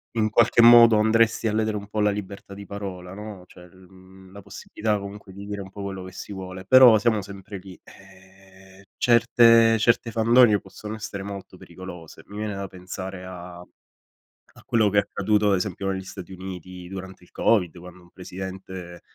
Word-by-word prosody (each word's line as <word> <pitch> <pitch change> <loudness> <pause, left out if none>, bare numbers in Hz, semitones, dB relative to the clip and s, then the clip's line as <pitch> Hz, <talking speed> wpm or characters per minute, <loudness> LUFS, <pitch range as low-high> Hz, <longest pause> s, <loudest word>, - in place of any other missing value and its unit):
In 110 -1 0
qualche 115 +1 +4
modo 115 -1 +8
andresti 110 +1 +2
a 105 - -1
ledere 110 -1 0
un 100 0 -8
po' 105 +1 -4
la 105 0 +3
libertà 100 -1 -7
di 100 0 -10
parola, 95 -3 -7
no, 105 -2 -9
cioè 90 0 -16
l 95 +1 -19
mhmm, 95 0 -18
la 100 +1 -11
possibilità 105 +2 -3
comunque 100 0 -9
di 100 +1 -10
dire 100 0 -5
un 95 - -9
po' 100 +1 -9
quello 95 -1 -6
che 95 - -10
si 100 - -8
vuole, 95 -1 -8
però 125 0 +8
siamo 110 0 +1
sempre 100 0 -9
lì, 95 -1 -13
ehm 95 0 -19 0.3
certe 115 -1 +5
certe 115 +1 +2
fandonie 115 -1 +4
possono 105 +2 -9
essere 105 -2 -7
molto 100 0 -9
pericolose. 90 -3 -11
Mi 100 - -11
viene 105 -1 -4
da 100 0 -5
pensare 95 0 -8
a 90 -1 -10 0.9
a - - -18
quello 110 -3 +2
che 100 - -1
è - - +6
accaduto 105 +1 0
ad - - +4
esempio 95 +1 -3
negli 95 0 -4
Stati 95 -1 -10
Uniti 90 -1 -9
durante 95 -1 -9
il - - -21
Covid, 90 -7 +1
quando 90 +1 -13
un 85 - -20
presidente, 95 -1 -9
100 Hz, 190 wpm, -24 LUFS, 95-105 Hz, 0.9 s, modo